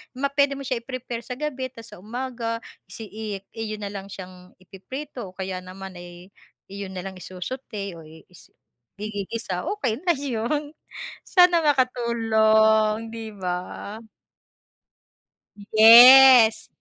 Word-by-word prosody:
ma 275 +2 -2
puwede 280 -1 +1
mo 275 - -8
siya 255 -2 -2
i-prepare 250 -1 -6
sa 250 - -7
gabi, 270 -2 -4
tapos 230 -3 -14
sa - - -15
umaga 230 +1 -5 0.3
isi 225 - -10
i 220 +1 -8 0.3
iyo 225 -2 -5
na 205 -1 -6
lang 195 -1 -7
siyang 185 -1 -12
ipiprito, 245 +6 -9
o - - -33
kaya 190 -1 -5
naman 190 +1 -10
ay, 175 +2 -13 0.4
iyon 200 -1 -7
na 180 - -5
lang 190 -1 -7
isu-sauté 200 +2 -7
o - - -12 0.3
is-igigisa, 195 - -8
okey 250 - -2
na 345 - +4
'yun. 285 +2 -3 0.6
Sana 355 -2 +5
makatulong, 225 -5 +2
'di 225 -2 -8
ba. 180 -2 -3 2.1
Yes. 240 +1 +8
225 Hz, 125 wpm, -23 LUFS, 195-255 Hz, 2.1 s, Yes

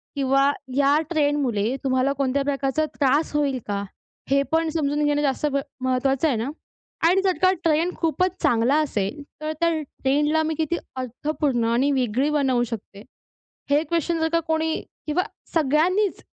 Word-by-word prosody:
किंवा 275 0 +3 0.2
या 280 +1 +4
ट्रेंडमुळे 285 - +1
तुम्हाला 260 +1 +1
कोणत्या 275 0 0
प्रकारचा 275 +2 0
त्रास 285 +3 +2
होईल 280 -3 +1
का? 200 -1 -2 0.5
हे 275 +1 +4
पण 325 0 +2
समजून 295 -2 0
घेणं 295 0 +2
जास्त 280 0 0
ब 280 - +1 0.2
महत्त्वाचं 260 +3 +1
आहे 260 -7 +1
ना? 235 +5 -2 0.6
आणि 370 +3 +4
जर 380 -2 +1
का 370 0 +5
ट्रेंड 330 +2 +2
खूपच 360 +2 +1
चांगला 245 -1 +3
असेल 215 -1 -2 0.2
तर 310 0 -2
त्या 335 0 +3
ट्रेंडला 295 +3 0
मी 315 0 -1
किती 320 +2 0 0.2
अर्थपूर्ण 255 0 -1
आणि 265 +4 +2
वेगळी 260 +1 +1
बनवू 270 -5 +2
शकते? 205 -2 -7 0.7
हे 290 +2 +4
क्वेशन 335 0 -1
जर 320 - +1
का 335 - +4
कोणी 320 0 +1 0.3
किंवा 320 +4 +1 0.3
सगळ्यांनीच 335 +7 +2
285 Hz, 155 wpm, -23 LUFS, 265-315 Hz, 0.7 s, का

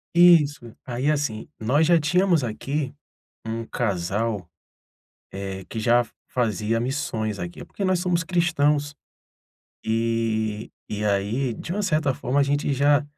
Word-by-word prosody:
Isso. 150 -9 +5
Aí 130 +3 -1
assim, 140 -8 -2
nós 130 +8 +3
já 170 +1 +5
tínhamos 175 0 +2
aqui 135 +5 -3 0.5
um 115 +1 -3
casal, 100 -2 -1 0.8
eh, 95 -1 -5
que 110 - -4
já 120 +2 +4
f - - -22 0.2
fazia 115 -2 0
missões 115 -5 -2
aqui, 85 -1 -6
porque 200 - -5
nós 185 -2 +2
somos 175 -1 +1
cristãos. 150 -4 +1 0.9
E 110 -1 -1 0.2
e 105 0 -3
aí, 105 +5 0
de 170 - -6
uma 210 +2 -1
certa 155 -7 +1
forma, 125 +3 -1
a 145 - +6
gente 145 +1 0
já 145 +2 +3
125 Hz, 135 wpm, -24 LUFS, 110-150 Hz, 0.9 s, a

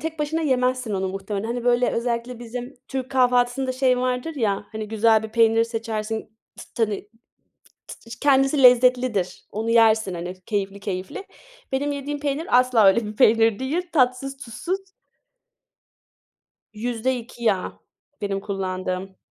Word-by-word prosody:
tek 320 0 -5
başına 300 +2 -1
yemezsin 255 -4 0
onu 190 0 -1
muhtemelen. 195 +2 -4
Hani, 240 +1 -3
böyle, 245 0 +3
özellikle 235 +1 -2
bizim 245 +2 -7
türk 260 -1 -4
kahvaltısında 250 0 +2
şey 255 -1 +2
vardır 250 +5 -2
ya, 205 -5 -1
hani, 215 -1 -5
güzel 220 0 +3
bir 220 - -5
peynir 225 0 +3
seçersin, 225 -1 -3 0.4
t - - -9
t 230 - +2
hani. 205 -1 -5 0.8
T 230 - -12
ç 230 - -9
kendisi 270 0 +3
lezzetlidir, 250 -6 +4
onu 220 +2 -3
yersin, 220 -4 +4
hani, 175 +1 -5
keyifli 200 -2 -2
keyifli. 190 - -5 0.5
Benim 285 +2 0
yediğim 285 +1 -4
peynir, 285 -2 +1
asla 250 -4 +4
öyle 210 +3 +4
bir 210 - -7
peynir 225 0 +4
değil, 280 +7 -1
tatsız 265 -1 +1
tuzsuz. 295 - -4 1.9
%2 240 +1 -3
yağ, 195 -5 0 0.4
benim 200 -1 -2
kullandığım. 190 -1 -4
235 Hz, 140 wpm, -23 LUFS, 215-255 Hz, 1.9 s, lezzetlidir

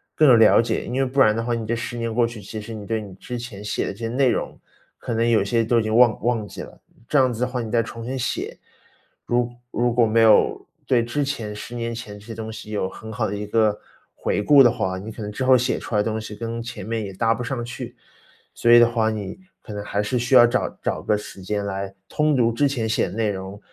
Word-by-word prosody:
更 155 - +4
有 120 - +8
了 110 - +6
解。 115 - -2
因 - - -6
为 135 +1 +1
不 135 +2 -2
然 110 -5 +5
的 115 - -1
话， 120 +1 -1
你 115 -2 -3
这 115 - 0
10 120 +1 -5
年 115 -1 -2
过 120 +1 +3
去， 115 -2 -7
其 110 +1 -7
实 115 +2 -8
你 105 -2 -7
对 110 0 -2
你 100 -3 -10
之 125 +5 -6
前 115 -4 -8
写 105 - -2
的 - - -3
这 100 - -12
些 115 - -3
内 130 +3 +2
容， - - -2 0.4
可 - - -5
能 115 +1 +1
有 110 -4 +4
些 115 +3 +1
都 115 +1 +3
已 - - -3
经 110 0 -2
忘 120 -3 +5
忘 115 -3 0
记 - - -8
了。 - - -11 0.3
这 145 - +4
样 130 -1 +4
子 115 0 -6
的 - - +3
话， 125 -1 -3
你 115 - -5
再 115 0 +2
重 115 +1 -8
新 130 +2 -3
写。 125 - -3 0.7
如 120 0 0 0.2
如 120 0 +1
果 120 -1 +4
没 115 +1 +3
有 110 -1 +4 0.2
对 120 -3 +3
之 120 +5 -2
前 115 -7 -4
10 110 +3 -8
年 115 0 -3
前 105 -3 -8
这 105 - -15
些 115 - -7
东 110 0 -6
西 110 -1 -9
有 100 -3 -1
很 110 +3 -10
好 110 -2 -1
的 105 - -3
一 105 - -4
个 105 0 +2 0.4
回 - - -1
顾 140 +6 +7
的 120 - +6
话， 95 0 -2
你 105 +4 -7
可 110 - -9
能 105 0 -4
之 105 - -4
后 130 0 +7
写 125 +1 +1
出 - - -8
来 105 - +4
的 - - 0
东 110 0 -2
西 110 -1 -7
跟 115 +1 -5
前 115 -4 -7
面 110 +2 -3
也 100 - -6
搭 115 +4 +2
不 125 - -5
上 120 0 -3
去。 120 0 -7 0.6
所 120 - +3
以 120 - +9
的 120 - +7
话， 110 -2 +1
你 105 - -5 0.2
可 - - -11
能 105 -1 -5
还 100 0 -1
是 105 +5 -1
需 120 +2 -1
要 120 -2 +9
找 125 +2 0
找 - - -2
个 105 - +2
时 105 -2 -8
间 105 +2 -2
来 100 -1 -4 0.2
通 150 -1 +1
读 115 -2 +3
之 140 +5 +2
前 120 -5 -2
写 110 - +1
的 - - -8
内 110 -2 0
容， 95 +1 -7
115 Hz, 295 characters per minute, -23 LUFS, 105-120 Hz, 0.7 s, 以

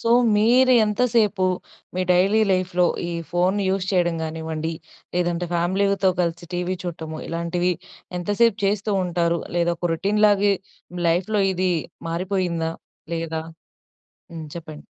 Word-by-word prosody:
So, 230 - 0 0.3
మీరు 250 +4 +5
ఎంతసేపు, 210 -3 +2 0.5
మీ 185 - 0
daily 195 +5 +4
లైఫ్‍లో 180 -1 +2 0.2
ఈ - - -3 0.2
ఫోన్‌ని 185 +3 +1
యూజ్ 190 -1 -1
చేయడం 175 -2 +2
గానివ్వండి 160 0 -4 0.4
లేదంటే, 175 0 0
ఫ్యామిలీతో 190 +2 +2
కలిసి 170 0 -2
టీవీ 180 +1 -1
చూడటము, 160 -2 -5
ఇలాంటివి 170 +2 0 0.5
ఎంతసేపు 205 +4 +2
చేస్తూ 205 +1 0
ఉంటారు? 170 -1 0 0.2
లేదా, 170 0 +2
ఒక 175 0 -1
రొటీన్‌లాగే 205 +2 +3 0.6
లైఫ్‌లో 195 +5 +1
ఇదీ 185 0 +1 0.4
మారిపోయిందా 170 -2 -1 0.4
లేదా 165 -1 -3 0.9
హ్మ్. 160 -2 -7
చెప్పండి. 155 -3 -9
180 Hz, 115 wpm, -23 LUFS, 170-200 Hz, 0.9 s, మీరు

